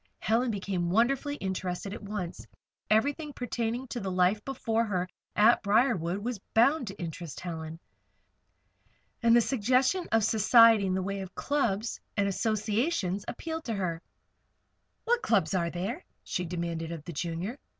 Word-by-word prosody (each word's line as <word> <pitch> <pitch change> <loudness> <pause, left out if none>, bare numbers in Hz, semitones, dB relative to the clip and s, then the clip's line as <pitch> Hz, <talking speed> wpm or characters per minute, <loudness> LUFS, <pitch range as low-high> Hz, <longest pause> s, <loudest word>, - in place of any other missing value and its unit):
Helen 230 - +1
became 190 -4 -2
wonderfully 270 - +2
interested 190 -2 -3
at - - -7
once. 200 -4 -5 0.4
Everything 285 +8 +1
pertaining 240 0 -3
to 240 - -3
the 195 - -3
life 185 +3 +2
before 230 -4 -1
her 185 -5 -1 0.3
at 220 +3 +5
Briarwood 200 -5 +2
was 245 -4 -2 0.2
bound 255 +3 +4
to 195 - -6
interest 165 -3 -6
Helen. 160 -2 -6 1.4
And 235 -1 +5
the 240 - +6
suggestion 260 - +1
of 225 0 +3
society 220 -1 +6
in 185 - 0
the 190 - -1
way 195 +1 -3
of 190 -1 -9
clubs 235 -7 -1 0.2
and 200 -1 +2
associations 215 - 0
appealed 320 +5 -5
to 230 - -2
her. 170 -4 -2 1.0
"What 480 0 +2
clubs 195 - +2
are 170 -3 +1
there?" 195 - -4 0.2
she 180 -3 -3
demanded 170 -1 -3
of 165 -3 -6
the 175 - -6
Junior. 170 - -4
210 Hz, 150 wpm, -29 LUFS, 180-240 Hz, 1.4 s, the